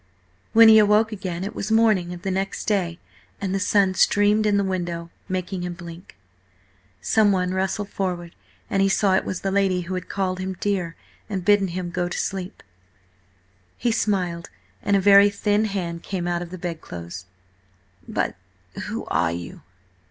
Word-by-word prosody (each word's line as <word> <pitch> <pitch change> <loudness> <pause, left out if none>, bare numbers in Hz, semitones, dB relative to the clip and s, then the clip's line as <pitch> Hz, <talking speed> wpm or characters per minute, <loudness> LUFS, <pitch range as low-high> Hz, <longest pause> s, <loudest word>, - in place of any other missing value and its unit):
When 230 0 +8
he 220 0 +9
awoke 210 +1 +4
again 185 -4 -4
it 200 - -4
was 215 - -4
morning 215 -6 +3
of 175 0 -8
the 195 - -1
next 195 +1 -2
day, 180 -5 0 0.4
and 190 -1 -2
the 195 - 0
sun 200 -1 +3
streamed 205 +2 +3
in 205 -1 +3
the 200 - +2
window, 175 -3 -3 0.2
making 185 0 -3
him 175 0 -4
blink. 170 0 -11 0.8
Someone 190 - +2
rustled 190 +2 -1
forward, 180 -4 -3 0.3
and 195 - 0
he 195 - +3
saw 195 0 +2
it 190 - +2
was 185 - -4
the 195 - -1
lady 190 -2 +2
who 175 +2 -5
had 185 -1 -5
called 185 -2 -2
him 185 0 -4
dear 185 -5 -1 0.3
and 190 -4 -3
bidden 205 -1 +4
him 175 0 -4
go 175 0 -1
to - - -4
sleep. 190 -1 -4 1.1
He 240 - 0
smiled, 180 -6 -1 0.3
and 205 - +1
a - - +4
very 200 +1 +7
thin 205 +1 +1
hand 175 -5 -3
came 180 -2 -4
out 175 0 -1
of 175 - -6
the 185 - -7
bedclothes. 90 - -7 0.8
"But - - -1 0.5
who - - -4
are 80 0 +1
you?" 85 0 -7
190 Hz, 175 wpm, -23 LUFS, 175-200 Hz, 1.1 s, he